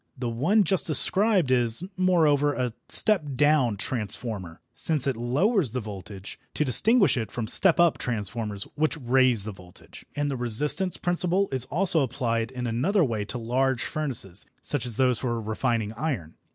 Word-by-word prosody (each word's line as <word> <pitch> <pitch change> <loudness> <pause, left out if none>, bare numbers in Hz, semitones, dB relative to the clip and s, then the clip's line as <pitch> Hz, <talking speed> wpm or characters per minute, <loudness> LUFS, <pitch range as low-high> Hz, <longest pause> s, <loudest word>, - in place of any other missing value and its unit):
The 125 -2 -4
one 165 - +1
just 190 +1 0
described 185 - +3
is, 120 +3 +1
moreover, 155 -6 +2
a 125 -2 -3 0.2
"step 215 -7 +4
down" 140 -6 +2
transformer, 105 -5 -5
since 155 -5 0
it 135 -2 -1
lowers 135 - 0
the 130 - -2
voltage, 100 -2 -10 0.2
to 150 - 0
distinguish 200 - +4
it 110 -4 -4
from 120 - -4
"step 175 - +3
up" 170 -2 +3
transformers, 105 -2 -4
which 155 +2 0
raise 125 -4 +2
the 110 - -6
voltage. 90 -2 -15
And 145 0 -2
the 135 -2 -3
"resistance" 145 - +2
principle 180 +2 0
is 130 -2 +1
also 175 +1 +2
applied 115 -4 -2
in 125 -1 -6
another 145 - 0
way 110 -7 -2
to 120 - -5
large 125 +2 -1
furnaces, 125 - -2 0.2
such 135 -4 -2
as 115 - +2
those 125 -3 +2
for 120 -3 -3
refining 110 0 -2
iron. 115 - -4
125 Hz, 165 wpm, -25 LUFS, 115-155 Hz, 0.2 s, step